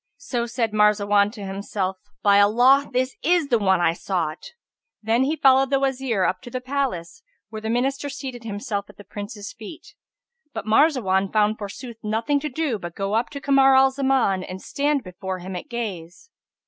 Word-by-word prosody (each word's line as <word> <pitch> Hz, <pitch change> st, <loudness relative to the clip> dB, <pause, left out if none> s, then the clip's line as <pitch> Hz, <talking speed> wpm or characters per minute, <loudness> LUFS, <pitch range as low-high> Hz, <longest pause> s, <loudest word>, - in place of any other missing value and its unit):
So 245 Hz, -4 st, -3 dB
said 230 Hz, -2 st, -2 dB
Marzawan 205 Hz, -1 st, +3 dB
to 205 Hz, -4 st, -8 dB
himself, 195 Hz, -1 st, -3 dB, 0.3 s
"By 200 Hz, -1 st, +5 dB
Allah; 245 Hz, +7 st, +5 dB
this 255 Hz, +1 st, -1 dB
is 345 Hz, -4 st, +2 dB
the 235 Hz, -, +3 dB
one 190 Hz, -3 st, +3 dB
I 170 Hz, -1 st, +2 dB
sought!" 175 Hz, -, -4 dB, 0.5 s
Then 230 Hz, +4 st, +2 dB
he 300 Hz, +3 st, 0 dB
followed 270 Hz, -2 st, +4 dB
the 275 Hz, -1 st, +2 dB
Wazir 265 Hz, -6 st, 0 dB
up 185 Hz, +1 st, 0 dB
to 245 Hz, -, -10 dB
the 255 Hz, -, -4 dB
palace, 260 Hz, -, -3 dB, 0.3 s
where 220 Hz, -1 st, -7 dB
the 220 Hz, -, -4 dB
Minister 270 Hz, +4 st, -1 dB
seated 255 Hz, -3 st, -7 dB
himself 205 Hz, -1 st, -4 dB
at 205 Hz, -, -16 dB
the 205 Hz, -, -12 dB
Prince's 205 Hz, 0 st, -8 dB
feet; 230 Hz, +8 st, -11 dB, 0.6 s
but 220 Hz, -2 st, -4 dB
Marzawan 215 Hz, -6 st, +2 dB
found 215 Hz, 0 st, +2 dB
forsooth 220 Hz, +3 st, -8 dB
nothing 225 Hz, +7 st, 0 dB
to 300 Hz, +1 st, -4 dB
do 275 Hz, -6 st, -2 dB
but 175 Hz, -2 st, -8 dB
go 195 Hz, +1 st, -2 dB
up 230 Hz, +2 st, +1 dB
to 285 Hz, -, -7 dB
Kamar 275 Hz, -1 st, +4 dB
al 265 Hz, 0 st, +5 dB
Zaman 265 Hz, -8 st, +1 dB
and 185 Hz, 0 st, -7 dB
stand 285 Hz, +4 st, -1 dB
before 185 Hz, 0 st, -6 dB
him 185 Hz, +1 st, -7 dB
at 180 Hz, -, -7 dB
gaze. 215 Hz, -, -6 dB
225 Hz, 185 wpm, -23 LUFS, 200-270 Hz, 0.6 s, By